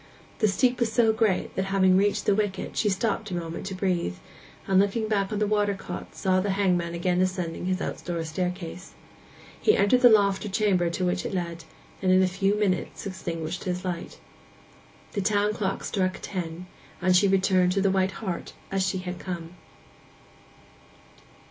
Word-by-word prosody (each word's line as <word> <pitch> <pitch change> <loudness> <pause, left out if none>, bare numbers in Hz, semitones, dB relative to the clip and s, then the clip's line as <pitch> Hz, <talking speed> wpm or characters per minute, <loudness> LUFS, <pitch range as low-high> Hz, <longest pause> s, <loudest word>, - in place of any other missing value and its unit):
The 215 - +4
steep 245 +6 +2
was 235 -2 +1
so 225 -1 +4
great 220 -4 0
that, 190 - 0
having 190 -1 +3
reached 200 +2 +2
the - - +4
wicket, 205 -2 -2
she 210 - +2
stopped 210 +2 -1
a 180 - -3
moment 165 +1 -5
to 195 - -4
breathe; 180 - -1 0.5
and, 190 -1 +3
looking 205 +3 +1
back 200 -2 +1
upon 210 - -3
the 210 - +2
water 205 -1 +1
side 195 - -9
cot, 90 - -7
saw 185 -1 +1
the 200 - -2
hangman 175 -4 +1
again 180 +1 +1
ascending 180 -2 -2
his 185 0 0
outdoor 170 -2 -3
staircase. 180 +2 -4 0.7
He 430 - +4
entered 250 +5 +4
the 245 - +9
loft 200 -3 +4
or 210 - -4
chamber 190 -4 +2
to 180 +2 -2
which 180 0 0
it - - -4
led, 170 -2 -4 0.4
and 185 -1 +2
in 185 0 +5
a - - +3
few 195 +2 +1
minutes 190 -5 -1
extinguished 170 -3 -4
his 180 0 -3
light. 175 -2 -5 0.9
The 205 - -2
town 205 +1 +2
clock 195 -3 -2
struck 185 -1 -1
ten, 175 -2 -5 0.3
and 185 0 +3
she 200 +3 +5
returned 190 -1 +3
to 195 - +1
the 195 0 +3
White 190 0 0
Hart 180 -3 -4 0.2
as 195 -1 +1
she 190 0 0
had 180 -1 -5
come. 175 -2 -6
190 Hz, 185 wpm, -26 LUFS, 180-200 Hz, 0.9 s, the